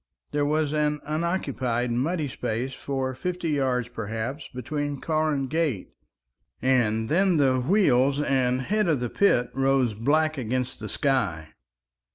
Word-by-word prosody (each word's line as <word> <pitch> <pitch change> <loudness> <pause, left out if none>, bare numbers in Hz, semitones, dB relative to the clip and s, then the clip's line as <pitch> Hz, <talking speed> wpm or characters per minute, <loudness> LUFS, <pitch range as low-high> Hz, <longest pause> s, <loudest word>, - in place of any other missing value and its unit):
There 145 -1 +1
was 150 0 +1
an 150 -1 +1
unoccupied 140 -7 -1
muddy 150 +6 0
space 125 0 -3
for 135 -1 -3
fifty 175 +5 -3
yards, 130 -4 0
perhaps, 115 +5 -5
between 145 +3 -4
car 155 -1 0
and 135 -2 -1
gate, 150 - -1 0.7
and 115 -4 +2
then 180 - +3
the 130 -3 +3
wheels 140 -5 +3
and 130 -3 +1
head 210 +5 +1
of 155 -5 +2
the 120 -1 -3
pit 125 -12 +2
rose 135 -3 +2
black 155 +7 +1
against 125 +1 -2
the - - -6
sky. 100 - 0
135 Hz, 140 wpm, -26 LUFS, 125-155 Hz, 0.7 s, then